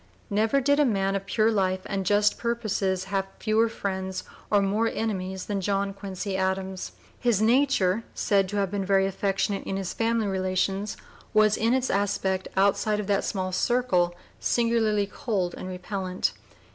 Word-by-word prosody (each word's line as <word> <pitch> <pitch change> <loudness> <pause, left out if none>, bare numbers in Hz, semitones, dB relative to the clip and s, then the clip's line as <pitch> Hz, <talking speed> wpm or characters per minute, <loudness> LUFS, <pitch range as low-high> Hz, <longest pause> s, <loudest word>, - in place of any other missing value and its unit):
Never 220 +6 +2
did 285 +2 +2
a - - +6
man 195 -6 +1
of 195 0 -3
pure 220 0 +2
life 190 -3 +1
and 195 -2 -2
just 205 0 +3
purposes 215 -5 -1
have 195 0 -2
fewer 220 +1 +2
friends 190 -3 -3 0.3
or 205 - +4
more 205 +3 +1
enemies 190 -5 -3
than 200 -2 -2
John 195 +1 0
Quincy 195 0 -5
Adams. 190 0 -2 0.3
His 235 -5 +2
nature, 225 -4 +3
said 195 -2 +2
to 205 - -3
have 195 -2 0
been 200 -1 -1
very 195 0 +3
affectionate 195 +1 -1
in 195 - -3
his 190 -2 -3
family 230 -1 +1
relations, 190 +1 -1 0.4
was 215 0 +5
in 230 +3 +2
its 260 0 0
aspect 195 -1 0
outside 200 +2 +2
of 210 - -2
that 200 0 +1
small 185 -2 -2
circle 185 -5 +1 0.2
singularly 225 -3 +2
cold 195 -4 -2
and - - -7
repellent. 185 0 -2
200 Hz, 160 wpm, -26 LUFS, 190-220 Hz, 0.4 s, a